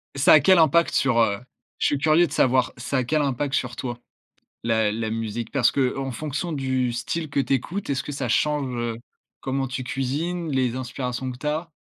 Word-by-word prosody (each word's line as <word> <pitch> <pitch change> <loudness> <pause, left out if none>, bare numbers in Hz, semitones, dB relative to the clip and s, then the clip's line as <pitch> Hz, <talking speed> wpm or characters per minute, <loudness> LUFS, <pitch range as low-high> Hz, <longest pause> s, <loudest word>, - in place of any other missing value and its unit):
Ça 135 - +6
a 155 - +9
quel 180 +4 +5
impact 165 +2 +4
sur, 135 -4 +2
heu 100 -3 +2 0.4
je - - +2
suis 145 - +1
curieux 155 +4 +4
de 140 - -14
savoir, 130 0 +2
ça 125 +3 -2
a 130 - +1
quel 155 +5 +1
impact 140 0 -1
sur 125 -2 -2
toi, 120 +1 -5 0.6
la 110 -2 +2
la 110 +1 -2
musique? 115 0 -3
Parce 125 -5 +3
qu'en 135 0 -1
fonction 150 +6 -4
du 130 -3 0
style 155 +6 -3
que - - 0
tu 135 0 +1
écoutes, 175 +10 -2
est-ce 135 -2 -1
que - - -6
ça 135 -3 -3
change, 140 +1 0
heu, 120 -1 -3 0.4
comment 135 0 -2
tu 130 +1 -4
cuisines, 150 +6 -2
les 130 -2 +1
inspirations 130 0 -4
que 125 - -9
tu 150 - -5
as? 160 +3 -2
130 Hz, 210 wpm, -24 LUFS, 120-150 Hz, 0.6 s, a